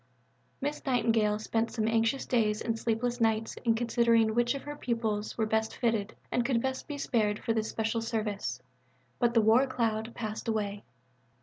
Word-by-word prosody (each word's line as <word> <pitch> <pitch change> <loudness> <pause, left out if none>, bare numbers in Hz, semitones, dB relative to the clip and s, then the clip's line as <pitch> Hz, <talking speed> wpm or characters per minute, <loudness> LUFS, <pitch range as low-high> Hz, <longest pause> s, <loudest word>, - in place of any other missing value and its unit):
Miss 290 +2 -3
Nightingale 225 -5 +2
spent 225 +1 -1
some 220 -2 -1
anxious 230 +4 +1
days 215 -3 +1
and 225 -1 -2
sleepless 240 +2 -1
nights 225 0 +1
in 230 -2 +3
considering 230 -1 +3
which 240 +3 +2
of 275 - -6
her 290 0 -6
pupils 225 -6 -2
were 220 - +2
best 220 0 0
fitted 225 -4 0 0.2
and 245 - +2
could 235 -1 +1
best 260 +2 -3
be 295 -2 -5
spared 215 -6 +1
for 225 - -1
this 220 -1 -1
special 225 +1 -1
service, 210 - -2 0.6
but 240 0 +2
the 225 - +6
war 225 +5 +5
cloud 230 -3 -1
passed 215 -1 -5
away. 205 -2 -2
225 Hz, 175 wpm, -30 LUFS, 220-240 Hz, 0.6 s, the